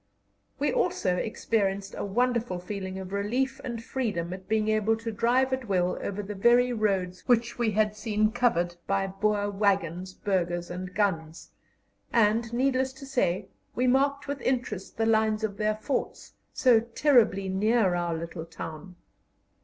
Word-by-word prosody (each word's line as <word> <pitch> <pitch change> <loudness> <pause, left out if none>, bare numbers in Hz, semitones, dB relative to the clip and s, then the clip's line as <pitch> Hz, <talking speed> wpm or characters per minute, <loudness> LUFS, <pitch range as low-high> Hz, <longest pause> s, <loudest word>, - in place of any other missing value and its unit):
We 295 +1 0
also 225 - +1
experienced 200 -2 -1
a - - -4
wonderful 235 -1 0
feeling 190 +1 -5
of 190 0 -7
relief 260 +7 -1
and 235 -2 -5
freedom 205 -10 -2
at 185 0 -9
being 215 -1 +1
able 215 +1 +2
to 230 0 -4
drive 250 +5 +2
at 260 -2 -3
will 180 -2 +1
over 205 +1 -3
the 205 +1 -5
very 240 +5 +4
roads 190 -5 -1
which 235 -1 +2
we 235 -2 +2
had 210 0 +1
seen 215 -1 +1
covered 175 -8 +1
by 195 0 +1
Boer 205 +1 0
waggons, 190 -3 0
burghers, 175 -3 -1
and 180 +1 -6
guns, 165 -6 -1 0.6
and, 225 +1 +2
needless 260 +1 +1
to 270 +1 -11
say, 245 -10 0 0.3
we 250 - +1
marked 280 +3 +2
with 285 0 -4
interest 240 -7 -2
the 225 - +1
lines 220 -1 +2
of 200 -2 -2
their 215 0 +1
forts, 220 +6 -3 0.2
so 245 -4 +5
terribly 230 -4 +3
near 200 +1 +2
our 175 -1 -1
little 165 0 -6
town. 165 +2 -8
215 Hz, 155 wpm, -27 LUFS, 190-240 Hz, 0.6 s, so